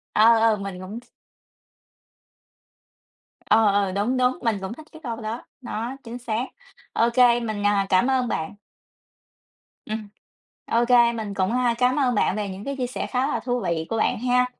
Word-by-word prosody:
Ờ, 225 +2 +6
ờ 225 -1 +4
mình 195 -2 -6
cũng 200 +5 -7
th - - -21 2.4
Ờ, 220 -1 +5
ờ, 200 -1 +1
đúng, 210 +7 0
đúng, 255 0 +2
mình 225 -4 0
cũng 190 +3 -4
thích 310 +4 -13
cái 315 - -12
câu 230 -3 -4
đó, 220 +3 -5 0.2
nó 240 +1 -4
chính 235 +1 -7
xác. 240 0 -2 0.5
Ô 230 +1 +3
kê, 245 -1 +5
mình, 215 -3 -3
à, 200 -1 +3
cảm 185 +7 +3
ơn 255 -2 +1
bạn 160 +1 -3 1.3
Ừm, 215 -1 -5 0.6
ô 235 +1 +2
kê 240 -1 +6
mình 215 -3 -4
cũng, 190 +1 0
à, 245 -1 +2
cám 250 +1 +2
ơn 250 -4 +2
bạn 200 - +2
về 205 -2 -3
những 190 +2 -7
cái 280 - -4
chia 250 -1 -1
sẻ 250 - -4
khá 255 +2 0
là - - -1
thú 245 -1 -2
vị 160 -4 -1
của 225 - -1
bạn 220 - +1
ha. 250 +1 +2
230 Hz, 190 wpm, -24 LUFS, 205-250 Hz, 2.4 s, Ờ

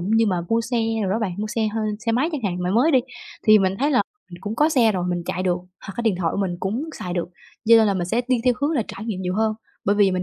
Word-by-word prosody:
như 220 +5 +2
mà 180 -4 +1
mua 230 0 +2
xe 240 +2 -2 0.3
đồ 190 - -1
đó 215 - +1
bạn 205 -5 -2
mua 215 - -2
xe 220 0 -1
hơ 220 +1 -3 0.2
xe 230 0 -1
máy 265 +8 +2
chẳng 295 - -2
hạn 180 -2 -1
mà 180 - 0
mới 245 - +4
đi, 265 - +5 0.4
thì 215 -2 +7
mình 190 -1 +1
thấy 285 +3 +2
là 255 - +4 0.3
mình 175 0 -11
cũng 205 +3 -4
có 300 +1 +4
xe 235 -8 +4
rồi 180 -2 -1
mình 175 -1 -1
chạy 185 - -2
được 180 -1 +1 0.3
hoặc 195 - -6
cái 235 - -2
điện 220 -4 +2
thoại 170 -3 0
của - - -3
mình 180 -3 -1
cũng 220 +10 -2
xài 180 - -4
được, 175 -1 -2 0.4
giơ 230 +1 +7
nên 220 -1 +5
là 200 - +1
mình 180 -2 -1
sẽ 225 +6 +1
đi 250 -3 +2
theo 250 -1 +4
hướng 285 - +1
là 290 -8 +1
trải 210 - -7
nghiệm 195 -5 -3
nhiều 180 0 -2
hơn. 220 0 +1 0.3
Bởi 205 +1 +2
vì 200 -2 +5
mình 185 0 -1
215 Hz, 315 wpm, -23 LUFS, 185-230 Hz, 0.4 s, thì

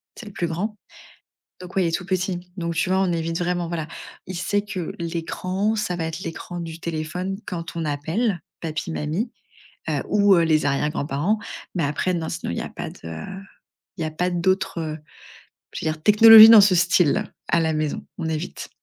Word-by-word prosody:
C'est 240 - -10
le 205 - -9
plus 175 -3 -2
grand. 200 +6 -3 0.8
Donc, 180 0 -11
ouais, 190 - +3
il - - +1
est - - -1
tout 180 - -6
petit, 185 -1 -1 0.2
donc 170 -2 -2
tu 165 +3 0
vois? 190 - +2
On 190 -2 +1
évite 165 0 -2
vraiment 175 0 -1
voilà. 165 -2 -4 0.4
Il 185 - -6
sait 205 +4 0
que, 190 -5 -5
l'écran, 185 +5 -2
ça 205 -4 -2
va 165 -2 -3
être 160 +2 -5
l'écran 175 +1 -6
du 165 -1 -7
téléphone, 170 +4 -4
quand 170 -2 -6
on 165 -1 -2
appelle, 160 +7 -1 0.2
papi 160 0 -4
mamie, 160 +11 -2 0.6
heu, - - 0
ou 205 -1 +5
heu, 170 - +4
les 155 -1 +2
arrière-grands-parents, 145 +6 0 0.4
mais 175 - 0
après, 150 +6 -1
non, 165 -2 -3
sinon 170 - -4
il - - -4
y - - -2
a - - -7
pas - - -6
de, - - -14
heu, 80 - -7 0.6
il - - -6
y - - 0
a 155 - -2
pas 180 +4 -1
d'autres, 180 0 0
heu, 155 -1 -4 0.8
je - - -5
veux 155 - +1
dire, 155 0 -11
technologie 220 +3 +10
dans 225 -2 +10
ce 200 -2 +5
style, 180 +2 +3 0.2
à 170 - +3
la 160 -1 +1
maison. 155 +7 -2
On 170 -5 -4
évite. 160 +2 -4
170 Hz, 205 wpm, -23 LUFS, 160-190 Hz, 0.8 s, technologie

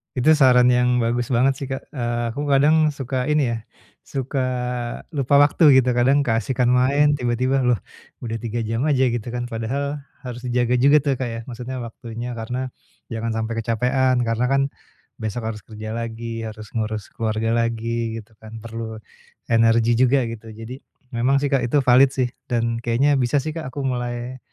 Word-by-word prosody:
Itu 135 +4 +4
saran 125 -5 +6
yang 125 0 +3
bagus 120 +1 0
banget 130 +2 +3
sih 140 - -4
Kak, 135 0 -6
eee, 120 -3 -2
aku 145 +5 -4
kadang 150 +3 +4
suka 135 -3 -2
ini 150 -5 +2
ya, 115 - -2 0.4
suka 135 +1 -4 0.7
lupa 140 -3 +1
waktu, 145 0 +5
gitu. 125 - +1
Kadang 130 +4 +3
keasyikan 120 +1 +1
main 140 +4 +4
tiba-tiba, 125 +2 +1
loh 125 - +4 0.5
udah 115 -1 -3
3 115 +1 -3
jam 115 +6 -1
aja, 130 -4 +3
gitu 120 -2 -3
kan. 120 0 -3
Padahal 130 +5 -3 0.2
harus 125 -2 -6
dijaga 125 0 +1
juga 140 +3 +5
tuh 140 -3 0
Kak, 130 - -1
ya. 115 -1 -5
Maksudnya 125 +1 -6
waktunya, 120 0 -7
karena 125 +3 -4 0.4
jangan 115 0 -2
sampai 115 +1 -3
kecapekan, 125 +3 +1
karena 115 +1 0
kan 135 +1 +2 0.6
besok 110 +2 -4
harus 105 - -8
kerja 110 0 -7
lagi, 115 0 -4
harus 110 -1 -10
ngurus 110 -2 -3
keluarga 110 0 -1
lagi, 115 0 -1
gitu 110 +1 -15
kan, 110 0 -11
perlu 115 -1 -6 0.6
energi 115 0 +4
juga, 130 +1 +4
gitu. 115 0 -9
Jadi, 115 +4 -9 0.3
memang 125 +4 +2
sih 145 - 0
Kak, 135 - +3
itu 145 +5 +2
valid 125 +2 +6
sih 125 -2 0 0.2
dan 115 -1 0
kayaknya 130 +5 +2
bisa 125 +2 0
sih 155 - -3
Kak, 160 -5 -5
aku 140 +2 -5
mulai 125 0 -3
120 Hz, 175 wpm, -22 LUFS, 115-130 Hz, 0.7 s, saran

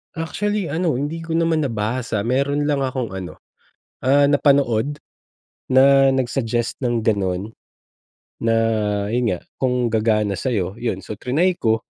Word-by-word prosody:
Actually 200 +4 -2
ano, 160 +1 0
hindi 150 +6 -3
ko 165 - -4
naman 165 -2 +1
nabasa, 115 -1 -2
meron 140 +5 0
lang 140 -2 +1
akong 130 -2 -3
ano, 90 -2 -8 0.6
ah, 140 +2 +4
napanood, 140 -2 +2 0.7
na 135 +1 +6
nag-suggest 120 -3 -1
ng 120 -4 -1
gano'n. 100 -1 -1 0.9
Na 115 0 +2 0.6
yun 120 -1 +1
nga, 90 - -2 0.2
kung 125 -1 +1
gagana 110 -2 +1
sa'yo, 95 -3 -2
yun 115 -6 -1
so - - -5
tinry 155 - +1
ko. 110 0 +3
130 Hz, 130 wpm, -21 LUFS, 110-145 Hz, 0.9 s, na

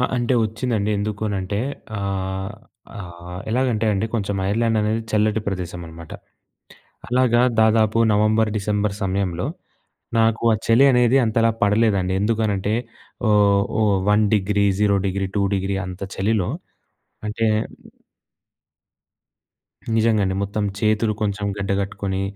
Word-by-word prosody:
అంటే 120 +1 0
వచ్చిందండి. 110 -1 -2
ఎందుకనంటే 100 -2 -2 0.4
ఆహ్, 95 0 -3 0.4
ఆహ్, 90 -1 -8
ఎలాగంటే 115 -2 0
అండి 100 +2 0
కొంచెం 100 -2 -2
ఐర్లాండ్ 115 +1 +1
అనేది 110 +2 0
చల్లటి 110 0 +1
ప్రదేశం 90 -3 -4
అనమాట. 80 0 -11 1.0
అలాగా 125 -1 +3 0.2
దాదాపు 110 0 +3 0.2
నవంబర్ 110 +1 +2
డిసెంబర్ 105 0 -1
సమయంలో 95 -3 -1 0.7
నాకు 110 0 +2
ఆ - - +3
చలి 115 +5 +6
అనేది 125 +1 +4
అంతలా 115 +1 +2
పడలేదండి. 100 -3 +2
ఎందుకనంటే 105 -2 0 0.6
ఓహ్, 100 -1 +4 0.2
ఓహ్, 105 -2 +3
1 105 +1 +4
డిగ్రీ, 100 0 +1 0.2
0 100 -1 +3
డిగ్రీ, 95 0 -2
2 100 - +2
డిగ్రీ 95 0 -1
అంత 90 +1 -8
చలిలో 100 -1 0 0.8
అంటే 110 +2 -1 2.5
నిజంగాండి. 110 -4 +2
మొత్తం 100 +1 -2 0.2
చేతులు 110 0 +1
కొంచెం 105 -1 -1
గడ్డ 100 0 -2
కట్టుకొని 95 0 -3
105 Hz, 115 wpm, -21 LUFS, 100-110 Hz, 2.5 s, చలి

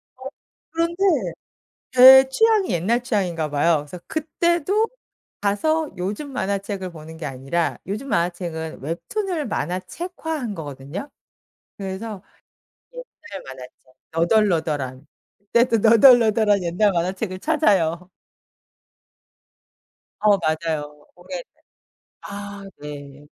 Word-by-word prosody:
어 260 - -14 0.5
그런데 335 +3 -1 0.9
제 265 +1 +9
취향이 430 - +3
옛날 195 +8 +1
취향인가 180 -10 -1
봐요. 150 +3 +3
그래서 150 +5 -8
그때도 340 +6 0 0.5
가서 305 +10 0
요즘 205 +11 -4
만화책을 200 -4 -3
보는 160 0 -11
게 160 - -6
아니라 135 +5 -2
요즘 215 +8 -5
만화책은 170 -3 -2
웹툰을 300 - -3
만화책화 230 - -4
한 230 -5 -4
거거든요. 145 - -7 0.7
그래서 195 +1 -6 0.7
옛날 205 - -10
만화책 130 -1 -9 0.4
너덜너덜한. 160 - +1 0.5
그때도 235 -1 +4
너덜너덜한 220 -3 +5
옛날 180 +5 +2
만화책을 185 +3 -2
찾아요. 185 - +1 2.1
어 210 -1 +5
맞아요. 155 -3 -3
고게 - - -7 0.8
아 200 0 -8 0.2
네. 145 -1 -9
200 Hz, 235 characters per minute, -22 LUFS, 165-255 Hz, 2.1 s, 제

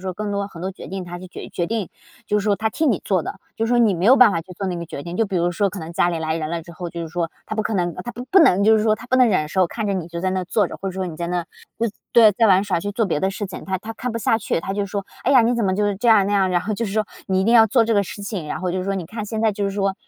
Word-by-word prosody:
说 185 -1 -3
更 210 +2 -4
多 200 0 -2
很 170 - -11
多 185 +2 -3
决 - - -10
定， 190 -1 -5
她 175 0 -7
就 185 - -9
决 - - -9
决 175 - -2
定。 220 -3 -2 0.4
就 210 - +1
是 - - -6
说 205 -2 +2
她 220 - 0
替 315 - 0
你 230 -9 +2
做 185 -4 +1
的， - - -6 0.2
就 225 - 0
说 245 +1 +2
你 220 -5 +4
没 175 +1 -2
有 255 +6 +7
办 250 -5 +7
法 165 - -1
去 180 +2 -12
做 195 +2 -4
那 180 -2 -2
个 170 - -5
决 145 -3 -7
定， 175 +1 -6
就 225 - +2
比 195 -2 -3
如 175 0 +1
说 200 +3 +1
可 195 - -7
能 165 0 -7
家 175 - +2
里 170 -2 -2
来 160 0 -1
人 155 -1 -3
了 170 0 -2
之 170 - -12
后， 175 +1 -6
就 170 -1 -5
是 165 - -6
说 165 0 -2 0.2
她 - - -4
不 215 - 0
可 215 - -2
能， 175 -3 0
她 240 - -4
不 245 - -7
不 385 - +6
能 200 - +5
就 220 +1 +6
是 215 - +1
说 215 -1 +3
她 225 +3 -11
不 255 - +2
能 255 -2 +5
忍 155 -7 +1
受， 185 +3 +2
看 220 +5 -4
着 200 - 0
你 180 -4 -3
就 170 0 -5
在 185 +1 0
那 185 -1 -1
坐 200 +3 +1
着， - - -8
或 195 - -3
者 - - -5
说 185 0 -3
你 160 - -7
在 170 - -3
那 175 0 -2 0.7
对， 225 -3 +7
在 225 +3 +3
玩 190 0 +4
耍 190 -4 0
去 205 +2 -3
做 225 +2 +1
别 150 -5 -1
的 190 - +1
事 205 +1 -4
情。 185 - -9
她 190 0 -1
她 215 +4 -7
看 250 +3 -4
不 230 - -2
下 225 +1 +2
去， 200 - -1
她 195 - -4
就 200 0 -2
说， 200 0 -4 0.2
哎 260 - +2
呀， 255 -3 +7
你 235 +2 +2
怎 235 -2 0
么 190 -1 +1
就 205 0 +1
这 235 +5 0
样， 210 -4 +6
那 205 - -1
样， 195 -2 +3
然 175 -1 +2
后 215 - -3
就 230 - -2
是 195 - -5
说， 215 -1 0 0.2
你 190 0 +1
一 - - +1
定 230 - +3
要 225 -1 +8
做 230 +1 +3
这 230 - 0
个 200 - +4
事 200 +2 -8
情， 200 -6 -4
然 - - -3
后 180 0 -1
就 185 - -1
是 185 - -3
说 195 - -1
你 190 -3 -3
看 215 +2 -6
现 220 +1 -4
在 220 -2 +3
就 200 0 -3
是 200 - 0
说， 195 -1 -1
195 Hz, 400 characters per minute, -21 LUFS, 180-220 Hz, 0.7 s, 要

